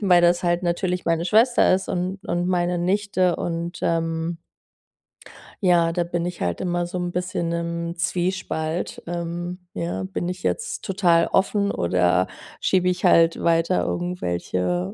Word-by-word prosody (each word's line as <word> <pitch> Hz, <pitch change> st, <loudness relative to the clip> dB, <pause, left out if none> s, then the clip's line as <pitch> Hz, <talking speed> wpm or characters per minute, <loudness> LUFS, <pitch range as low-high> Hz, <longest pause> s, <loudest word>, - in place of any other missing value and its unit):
weil 180 Hz, -4 st, +5 dB
das 175 Hz, +1 st, +3 dB
halt 175 Hz, +1 st, +1 dB
natürlich 180 Hz, +1 st, -1 dB
meine 165 Hz, 0 st, +1 dB
Schwester 225 Hz, +6 st, +4 dB
ist 190 Hz, +1 st, -2 dB
und 185 Hz, +2 st, -2 dB
und 175 Hz, 0 st, -1 dB
meine 175 Hz, -1 st, +1 dB
Nichte 185 Hz, -1 st, +1 dB
und, 170 Hz, +1 st, -3 dB
ähm 165 Hz, 0 st, -1 dB, 1.3 s
ja, 175 Hz, -3 st, +4 dB
da 175 Hz, 0 st, +1 dB
bin 170 Hz, 0 st, -2 dB
ich 175 Hz, 0 st, -5 dB
halt 85 Hz, -1 st, -1 dB
immer 175 Hz, -1 st, -1 dB
so 175 Hz, +1 st, -5 dB
'n 175 Hz, 0 st, -2 dB
bisschen 180 Hz, -1 st, -2 dB
im 170 Hz, 0 st, -3 dB
Zwiespalt. 175 Hz, -2 st, -2 dB
Ähm, 175 Hz, +1 st, -4 dB
ja, 170 Hz, +2 st, -3 dB
bin 190 Hz, -2 st, -3 dB
ich 180 Hz, 0 st, -6 dB
jetzt 470 Hz, 0 st, -2 dB
total 180 Hz, -4 st, +3 dB
offen, 200 Hz, +1 st, +1 dB
oder 90 Hz, +1 st, +2 dB, 0.3 s
schiebe 180 Hz, -1 st, +2 dB
ich 180 Hz, 0 st, -1 dB
halt 165 Hz, 0 st, +5 dB
weiter 170 Hz, +2 st, +2 dB
irgendwelche, 90 Hz, -, -2 dB
175 Hz, 150 wpm, -23 LUFS, 170-180 Hz, 1.3 s, weil